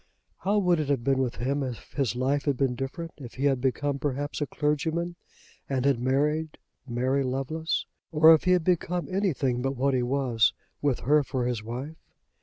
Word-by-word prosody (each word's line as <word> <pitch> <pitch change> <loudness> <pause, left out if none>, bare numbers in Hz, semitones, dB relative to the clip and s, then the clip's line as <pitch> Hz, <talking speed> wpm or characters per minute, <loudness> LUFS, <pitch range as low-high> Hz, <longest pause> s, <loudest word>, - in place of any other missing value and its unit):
How 200 +2 +1
would 180 -4 +3
it 150 -2 -2
have 135 -4 +1
been 135 +1 +2
with 130 -2 0
him 140 +4 -1
if 125 -4 -6
his 135 -4 0
life 135 +3 0
had 140 -3 +1
been 135 -2 +1
different; 135 +7 -5
if 125 -5 -10
he 135 - -1
had 135 -3 +2
become, 140 +2 0
perhaps, 145 +2 -2
a 145 - 0
clergyman 160 +4 -1 0.5
and 135 -1 0
had 140 -4 +3
married 150 +5 0 0.3
Mary 130 +3 0
Lovelace? 135 +5 -2 0.3
or 160 +1 +8
if 160 - +2
he 180 - +5
had 180 -2 +2
become 180 0 0
anything 145 -11 0
but 135 +1 -1
what 135 +2 +1
he 130 - +2
was 125 -2 +2 0.3
with 140 -4 +1
her 150 +3 +4
for 130 -3 -2
his 120 -3 -1
wife? 130 +8 -6
140 Hz, 195 wpm, -27 LUFS, 130-155 Hz, 0.5 s, or